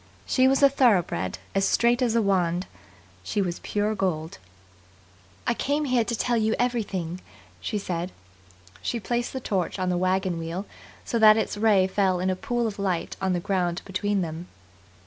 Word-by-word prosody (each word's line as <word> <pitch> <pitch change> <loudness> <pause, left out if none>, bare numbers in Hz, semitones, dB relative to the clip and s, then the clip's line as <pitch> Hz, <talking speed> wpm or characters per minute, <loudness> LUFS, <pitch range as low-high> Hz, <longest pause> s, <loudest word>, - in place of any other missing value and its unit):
She 260 0 +3
was 270 +1 +3
a - - +10
thoroughbred, 190 - +2 0.2
as 195 - +1
straight 240 +5 +3
as 235 -2 +2
a 230 - +3
wand. 180 -2 +1 0.6
She 95 - -3
was 180 -3 -1
pure 210 +1 -1
gold. 170 - -2 1.1
"I - - +2
came 290 +5 -1
here 250 -3 +2
to 235 +1 -2
tell 240 +1 0
you 220 0 +1
everything," 195 -8 -2 0.4
she 215 - -3
said. 180 -2 -3 0.7
She 235 - -2
placed 240 +2 -2
the 260 - -4
torch 195 -8 -2
on 185 -1 -1
the 180 -1 0
wagon 185 -2 +1
wheel 165 +4 -4 0.4
so 235 - -1
that 215 0 +8
its 220 - -1
ray 205 -3 +4
fell 190 -1 +1
in 185 +1 +1
a - - -1
pool 240 +2 -1
of 210 -2 -4
light 185 -4 -1
on 190 -1 +1
the 175 - 0
ground 175 -1 -1
between 200 +1 -1
them. 165 +1 -5
195 Hz, 180 wpm, -26 LUFS, 180-235 Hz, 1.1 s, a